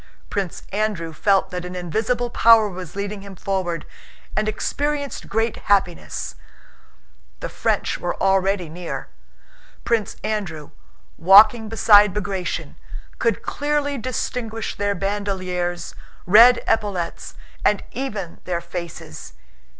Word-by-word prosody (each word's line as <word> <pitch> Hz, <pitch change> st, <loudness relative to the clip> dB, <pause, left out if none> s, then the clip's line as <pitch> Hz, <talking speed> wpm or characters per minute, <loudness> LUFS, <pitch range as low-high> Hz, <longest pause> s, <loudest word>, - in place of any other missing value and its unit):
Prince 195 Hz, -4 st, -3 dB
Andrew 200 Hz, -6 st, -2 dB
felt 195 Hz, +4 st, +2 dB
that 180 Hz, -1 st, -4 dB
an 180 Hz, +1 st, -7 dB
invisible 220 Hz, +7 st, -1 dB
power 225 Hz, -2 st, +6 dB
was 185 Hz, -3 st, -8 dB
leading 200 Hz, 0 st, -4 dB
him 200 Hz, -1 st, -10 dB
forward, 180 Hz, -3 st, -2 dB, 0.5 s
and 215 Hz, 0 st, +1 dB
experienced 285 Hz, +5 st, -3 dB
great 225 Hz, +2 st, 0 dB
happiness. 190 Hz, -4 st, 0 dB, 1.1 s
The -, -, -5 dB
French -, -, -1 dB
were -, -, -3 dB
already 195 Hz, -1 st, +2 dB
near. 170 Hz, +2 st, -6 dB, 0.8 s
Prince 230 Hz, -3 st, 0 dB
Andrew, 175 Hz, -9 st, -3 dB, 0.5 s
walking 215 Hz, +5 st, +7 dB
beside 210 Hz, -3 st, +6 dB
Bagratión, 195 Hz, -4 st, -3 dB, 0.4 s
could -, -, 0 dB
clearly 290 Hz, -1 st, -1 dB
distinguish 225 Hz, -2 st, -3 dB
their 205 Hz, 0 st, 0 dB
bandoliers, 185 Hz, -3 st, -2 dB, 0.3 s
red 230 Hz, +6 st, +7 dB
epaulets, 200 Hz, -6 st, -1 dB, 0.3 s
and 210 Hz, -, +2 dB
even 210 Hz, -10 st, -5 dB
their 175 Hz, -2 st, -1 dB
faces. 170 Hz, -, -8 dB
200 Hz, 110 wpm, -22 LUFS, 180-220 Hz, 1.1 s, walking